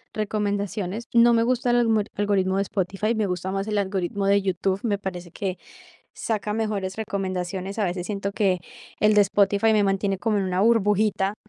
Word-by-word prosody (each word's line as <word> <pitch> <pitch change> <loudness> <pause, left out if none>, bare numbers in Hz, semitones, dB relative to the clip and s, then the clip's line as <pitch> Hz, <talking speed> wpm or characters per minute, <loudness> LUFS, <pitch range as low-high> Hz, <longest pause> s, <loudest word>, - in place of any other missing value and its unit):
recomendaciones. 205 0 -2
No 235 0 +6
me 230 0 +3
gusta 250 +1 0
el - - +3
almorit 225 -3 +2
algoritmo 195 -2 +1
de 195 - +2
Spotify, 195 +3 -1
me 215 -2 0
gusta 180 0 -3
más 195 +1 -2
el 210 -1 -1
algoritmo 195 0 -2
de 200 0 +4
YouTube, 190 0 -1
me 210 -4 0
parece 180 -3 -6
que 190 0 -4 0.6
saca 210 -2 -2
mejores 210 -4 -2
recomendaciones. 190 -2 -3
A 210 - +2
veces 180 -1 -3
siento 200 -1 -3
que 195 -3 +1 0.4
el 215 0 +4
de 210 - +7
Spotify 200 +2 +2
me 215 -1 +3
mantiene 195 0 0
como 215 +1 0
en 195 - 0
una 185 0 -1
burbujita, 210 -2 +2
200 Hz, 185 wpm, -24 LUFS, 190-215 Hz, 0.6 s, de